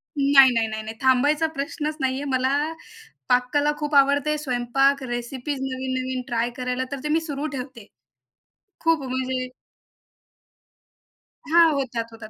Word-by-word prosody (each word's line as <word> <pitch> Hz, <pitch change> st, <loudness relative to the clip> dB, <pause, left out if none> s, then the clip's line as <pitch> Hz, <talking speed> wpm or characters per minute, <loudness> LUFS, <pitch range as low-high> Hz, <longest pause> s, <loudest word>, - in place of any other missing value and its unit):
नाही, 275 Hz, -2 st, +6 dB
नाही, 230 Hz, -1 st, +1 dB
नाही, 220 Hz, 0 st, -5 dB
नाही 220 Hz, +1 st, -6 dB
थांबायचा 285 Hz, +5 st, +3 dB
प्रश्नच 300 Hz, +2 st, -3 dB
नाहीये, 265 Hz, +1 st, -1 dB
मला 260 Hz, 0 st, +1 dB, 0.8 s
पाककला 250 Hz, +4 st, +2 dB
खूप 295 Hz, -1 st, -2 dB
आवडते, 285 Hz, +2 st, +3 dB
स्वयंपाक, 270 Hz, 0 st, +1 dB
रेसिपीज, 250 Hz, +3 st, -4 dB
नवीन-नवीन 260 Hz, -1 st, -3 dB
ट्राय 235 Hz, -1 st, 0 dB
करायला, 250 Hz, 0 st, -2 dB
तर 280 Hz, -, -4 dB
ते 300 Hz, -, -3 dB
मी 315 Hz, +2 st, +3 dB
सुरू 290 Hz, 0 st, -3 dB
ठेवते. 250 Hz, -4 st, -8 dB, 1.0 s
खूप 330 Hz, -3 st, +2 dB
म्हणजे 255 Hz, 0 st, -2 dB, 2.0 s
हां, 330 Hz, +1 st, +5 dB
होतात, 245 Hz, -5 st, -2 dB
होतात. 225 Hz, -1 st, -10 dB
265 Hz, 125 wpm, -23 LUFS, 250-285 Hz, 2.0 s, नाही